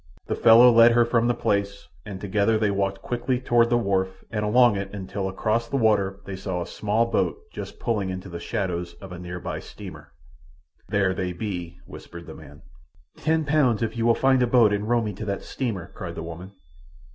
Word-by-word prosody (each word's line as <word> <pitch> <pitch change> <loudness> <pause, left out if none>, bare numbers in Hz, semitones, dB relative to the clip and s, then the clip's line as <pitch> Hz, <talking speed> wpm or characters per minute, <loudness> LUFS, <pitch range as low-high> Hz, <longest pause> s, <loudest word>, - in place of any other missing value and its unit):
The - - -2
fellow 120 +2 +7
led 115 0 +7
her 120 0 +4
from 120 0 +1
the 120 - +1
place, 100 0 -1 0.2
and 100 -2 -6
together 100 +2 +1
they 105 -2 +1
walked 100 0 -2
quickly 125 +1 -1
toward 120 -2 +3
the 120 - +3
wharf 95 -4 -1
and 105 -2 -2
along 120 +1 +4
it 100 0 -4
until 95 0 -4
across 110 +4 -1
the 140 - -4
water 100 -4 +1
they 95 - -6
saw 95 -1 -4
a 85 - -3
small 110 +2 0
boat 115 - 0 0.2
just - - -7
pulling 105 -5 -1
into 95 +1 -6
the 85 -2 -7
shadows 90 -5 -3
of 95 -1 -12
a 90 - -7
near 90 0 -6
by - - -5
steamer. - - -11 0.8
"There 95 -2 +1
they 90 -1 -3
be," 90 -3 -5
whispered 85 0 -11
the - - -9
man. 75 0 -14 0.5
"Ten 160 0 0
pounds 135 -7 +2
if 115 0 -3
you 115 0 0
will 115 - +5
find 130 -1 +3
a 125 - +3
boat 115 -4 +4
and 105 +2 -2
row 120 -1 +2
me 105 -1 -3
to 105 +4 -7
that 100 -1 -3
steamer," 105 -10 -4
cried 85 -2 -7
the - - -5
woman. 85 +4 -9
105 Hz, 210 wpm, -24 LUFS, 95-115 Hz, 0.8 s, fellow